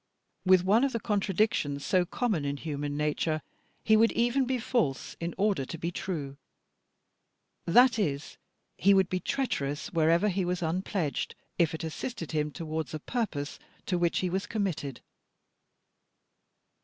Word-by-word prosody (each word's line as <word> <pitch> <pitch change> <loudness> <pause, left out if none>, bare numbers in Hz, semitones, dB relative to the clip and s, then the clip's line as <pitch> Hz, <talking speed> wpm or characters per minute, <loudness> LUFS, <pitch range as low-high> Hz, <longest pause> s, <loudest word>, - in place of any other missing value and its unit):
With 185 -1 +6
one 210 +6 +4
of 275 -2 +1
the 230 - 0
contradictions 200 -9 0
so 185 -3 +3
common 205 - 0
in 140 0 -2
human 145 -1 -3
nature, 150 +1 0 0.4
he 220 - +5
would 225 +1 +5
even 240 +3 +2
be 260 +1 0
false 220 - -1
in 170 0 -4
order 200 -8 +2
to 165 - -6
be 170 +2 -3
true: 145 -7 -4 1.3
that 240 +6 +6
is, 150 -7 -2 0.4
he 200 +1 +6
would 190 -1 +3
be 185 - 0
treacherous 165 - -2
wherever 165 +5 +3
he 190 0 0
was 180 0 -1
unpledged, 170 -1 -1 0.2
if 165 -1 +3
it 160 - -6
assisted 165 - -5
him 150 -1 0
towards 155 -1 -4
a - - -4
purpose 160 - -3 0.3
to 180 -2 0
which 170 -1 +1
he 185 - 0
was 190 +2 -1
committed. 175 - -2
175 Hz, 150 wpm, -29 LUFS, 150-210 Hz, 1.3 s, With